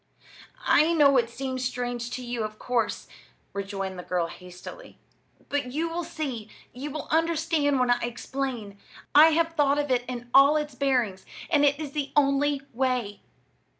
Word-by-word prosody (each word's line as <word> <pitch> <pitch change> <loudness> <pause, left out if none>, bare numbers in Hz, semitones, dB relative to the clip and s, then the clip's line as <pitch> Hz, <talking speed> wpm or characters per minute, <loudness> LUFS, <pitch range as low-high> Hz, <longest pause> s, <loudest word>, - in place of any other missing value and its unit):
"I 315 +3 +4
know, 285 -4 +5
it 235 -2 +2
seems 260 +1 -4
strange 245 -1 -3
to 250 0 -6
you, 240 -2 -3
of 215 0 -5
course" 240 -1 -1 0.5
rejoined 195 -2 -4
the - - -6
girl, 180 -1 0
hastily; 180 - -11 0.5
"but 285 -3 -2
you 320 +3 0
will 345 +1 -3
see 280 -10 -5 0.2
you 270 +4 -6
will 305 +1 -6
understand 320 -3 +1
when 250 -1 +3
I 245 - +3
explain. 240 -3 -4 0.3
I 305 +2 +9
have 330 +1 +1
thought 290 -3 +2
of 290 -2 -1
it 245 -1 +2
in 245 -1 -6
all 280 +3 +7
its 300 -2 -3
bearings, 250 -8 0 0.3
and 295 -3 +4
it 285 0 +3
is 300 -3 -5
the 290 -1 -3
only 280 0 +2
way. 250 -4 -1
265 Hz, 165 wpm, -26 LUFS, 235-295 Hz, 0.5 s, I